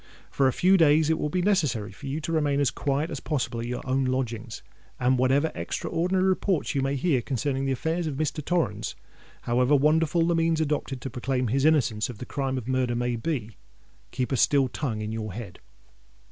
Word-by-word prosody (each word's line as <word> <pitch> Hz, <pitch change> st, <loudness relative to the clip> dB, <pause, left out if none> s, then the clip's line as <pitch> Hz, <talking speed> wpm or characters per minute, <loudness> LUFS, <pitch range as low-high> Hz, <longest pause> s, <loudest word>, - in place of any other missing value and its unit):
For 135 Hz, -, +2 dB
a -, -, +3 dB
few 185 Hz, +8 st, +4 dB
days 155 Hz, -1 st, +4 dB
it 160 Hz, -, 0 dB
will 150 Hz, -, -1 dB
be 180 Hz, +3 st, 0 dB
necessary 150 Hz, -, +1 dB
for 140 Hz, +8 st, -10 dB
you 140 Hz, +3 st, -2 dB
to 165 Hz, -, -4 dB
remain 145 Hz, -3 st, +1 dB
as 140 Hz, -, +2 dB
quiet 145 Hz, +3 st, -1 dB
as 145 Hz, -, -4 dB
possible 135 Hz, -6 st, -2 dB
at 115 Hz, -, -4 dB
your 125 Hz, 0 st, -4 dB
own 130 Hz, +1 st, +1 dB
lodgings; 120 Hz, -3 st, -3 dB, 0.4 s
and 125 Hz, +1 st, +3 dB
whatever 135 Hz, +5 st, +2 dB
extraordinary 185 Hz, +3 st, -1 dB
reports 190 Hz, -2 st, 0 dB
you 140 Hz, -, 0 dB
may 135 Hz, +1 st, 0 dB
hear 140 Hz, -2 st, +1 dB
concerning 135 Hz, +2 st, -2 dB
the 135 Hz, -, 0 dB
affairs 160 Hz, +6 st, -1 dB
of 145 Hz, -, -3 dB
Mr. 150 Hz, +1 st, -2 dB
Torrens—however 135 Hz, -5 st, -1 dB
wonderful 160 Hz, +3 st, +3 dB
the 170 Hz, -, +2 dB
means 165 Hz, -1 st, +2 dB
adopted 145 Hz, -4 st, -2 dB
to 135 Hz, -, -5 dB
proclaim 125 Hz, -1 st, -1 dB
his 135 Hz, +4 st, +1 dB
innocence 130 Hz, -9 st, +2 dB
of 120 Hz, -, -7 dB
the 125 Hz, -, -7 dB
crime 135 Hz, -1 st, -2 dB
of 125 Hz, -2 st, -5 dB
murder 130 Hz, -2 st, 0 dB
may 120 Hz, 0 st, -1 dB
be—keep 115 Hz, -, -6 dB
a 135 Hz, -, +1 dB
still 135 Hz, +3 st, +4 dB
tongue 120 Hz, -8 st, -3 dB
in 105 Hz, -, -4 dB
your 110 Hz, -3 st, -4 dB
head! 105 Hz, -3 st, -8 dB
135 Hz, 200 wpm, -26 LUFS, 125-155 Hz, 0.4 s, few